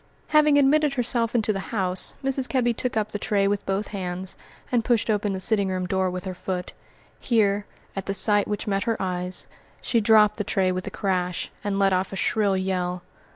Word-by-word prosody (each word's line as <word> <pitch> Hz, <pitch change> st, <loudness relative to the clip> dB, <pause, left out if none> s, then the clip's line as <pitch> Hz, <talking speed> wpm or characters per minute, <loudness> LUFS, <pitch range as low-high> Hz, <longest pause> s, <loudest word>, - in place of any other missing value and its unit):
Having 300 Hz, -1 st, +5 dB
admitted 290 Hz, +1 st, +3 dB
herself 240 Hz, -2 st, +1 dB
into 220 Hz, -2 st, +2 dB
the 195 Hz, -, -3 dB
house, 190 Hz, -4 st, +2 dB
Mrs. 270 Hz, -1 st, -1 dB
Kebby 240 Hz, -3 st, +1 dB
took 245 Hz, 0 st, -3 dB
up 215 Hz, 0 st, -1 dB
the 210 Hz, -, -4 dB
tray 200 Hz, -1 st, +1 dB
with 205 Hz, 0 st, -1 dB
both 195 Hz, +2 st, -1 dB
hands, 185 Hz, -2 st, -5 dB, 0.4 s
and 240 Hz, -2 st, +2 dB
pushed 230 Hz, -2 st, +1 dB
open 205 Hz, -1 st, 0 dB
the 190 Hz, -, -3 dB
sitting 200 Hz, 0 st, +2 dB
room 185 Hz, -1 st, -2 dB
door 190 Hz, 0 st, 0 dB
with 180 Hz, 0 st, -5 dB
her 185 Hz, -, -4 dB
foot. 180 Hz, 0 st, -5 dB, 0.5 s
Here, 205 Hz, -4 st, +1 dB, 0.3 s
at 195 Hz, -, -5 dB
the 195 Hz, -, -1 dB
sight 205 Hz, 0 st, +3 dB
which 210 Hz, 0 st, -3 dB
met 195 Hz, 0 st, -1 dB
her 230 Hz, -2 st, -1 dB
eyes, 180 Hz, -1 st, -2 dB, 0.3 s
she 230 Hz, -, +1 dB
dropped 210 Hz, -1 st, +5 dB
the 210 Hz, -, -1 dB
tray 190 Hz, -2 st, +1 dB
with 185 Hz, 0 st, -4 dB
a -, -, -1 dB
crash, 180 Hz, -3 st, -2 dB
and 205 Hz, -1 st, -1 dB
let 195 Hz, -1 st, +3 dB
off 185 Hz, +1 st, 0 dB
a -, -, -5 dB
shrill 200 Hz, +1 st, +1 dB
yell. 180 Hz, -1 st, -2 dB
200 Hz, 205 wpm, -24 LUFS, 185-225 Hz, 0.5 s, Having